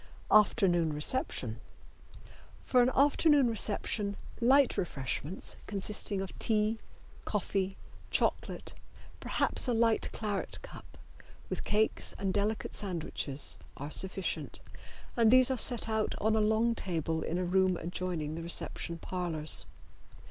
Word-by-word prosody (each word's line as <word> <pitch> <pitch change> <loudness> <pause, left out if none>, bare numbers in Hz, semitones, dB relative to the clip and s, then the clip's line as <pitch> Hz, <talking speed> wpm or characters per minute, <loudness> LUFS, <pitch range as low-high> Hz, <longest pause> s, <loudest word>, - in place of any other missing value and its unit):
Afternoon 185 -6 +4
Reception. 150 - -2 1.0
For 250 - +3
an 245 - +4
afternoon 285 0 +4
reception 210 -2 +1 0.2
light 265 +2 +4
refreshments, 150 0 -3
consisting 200 0 +1
of 195 - -7
tea, 220 0 +1 0.4
coffee, 195 -1 -2 0.3
chocolate, - - -1 0.5
perhaps - - 0
a 245 - +1
light 225 -1 +2
claret 210 -3 -3
cup, - - -12 0.5
with - - -3
cakes 215 +1 0
and 195 -1 -2
delicate 210 +2 -1
sandwiches, 165 -7 -2 0.2
are 145 +2 -6
sufficient, 190 +1 -1 0.6
and 230 -2 +4
these 255 +2 +6
are - - +1
set 240 -3 +2
out 220 -1 -1
on 220 +1 +1
a 220 - +2
long 220 +2 +2
table 165 -6 -2
in 170 - -2
a 180 - -1
room 185 0 +2
adjoining 170 -3 -4
the 165 - -5
reception 170 0 -3
parlors. 165 -3 +1
200 Hz, 120 wpm, -31 LUFS, 175-225 Hz, 1.0 s, these